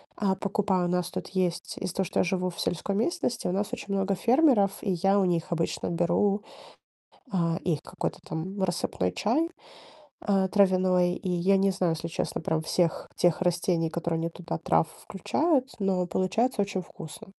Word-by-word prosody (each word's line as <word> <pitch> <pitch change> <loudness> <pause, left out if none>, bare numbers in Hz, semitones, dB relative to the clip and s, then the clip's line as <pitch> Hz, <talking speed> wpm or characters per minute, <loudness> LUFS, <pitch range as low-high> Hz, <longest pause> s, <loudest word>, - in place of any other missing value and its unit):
а, 195 -2 +1
покупаю. 195 -1 0
У - - -1
нас 180 -1 0
тут - - -5
есть 185 -2 -1
из-за 180 -2 -4
того, 190 - +1
что - - -1
я - - +5
живу 185 0 0
в 175 - -10
сельской 185 +4 -1
местности, 245 - -1
у - - 0
нас 200 +2 -1
очень 200 - -4
много 195 0 +1
фермеров, 240 - +4
и 200 - -1
я 195 +3 +3
у 195 - +3
них 170 -2 0
обычно 165 -1 -1
беру, 175 +4 +1 0.9
а, 170 -3 +1
их 160 -4 0
какой-то - - -4
там 190 +5 -4
рассыпной 170 - -1
чай, 305 +11 +1 0.8
э, 195 -2 +3
травяной. 185 -3 +4
И 185 - -4
я 180 +2 +3
не 195 0 +3
знаю, 185 -3 +1
если 165 +1 -4
честно, 160 - -3
прям 160 -1 0
всех 165 +1 0
тех 175 -1 +2
растений, 175 -2 +1
которые 170 0 -2
они 165 +1 -1
туда 170 0 -5
трав 160 0 +2 0.2
включают, 265 - 0
но 190 -3 +1
получается 205 +7 +1
очень 195 -1 -3
вкусно. 160 -3 -10
185 Hz, 180 wpm, -27 LUFS, 170-200 Hz, 0.9 s, я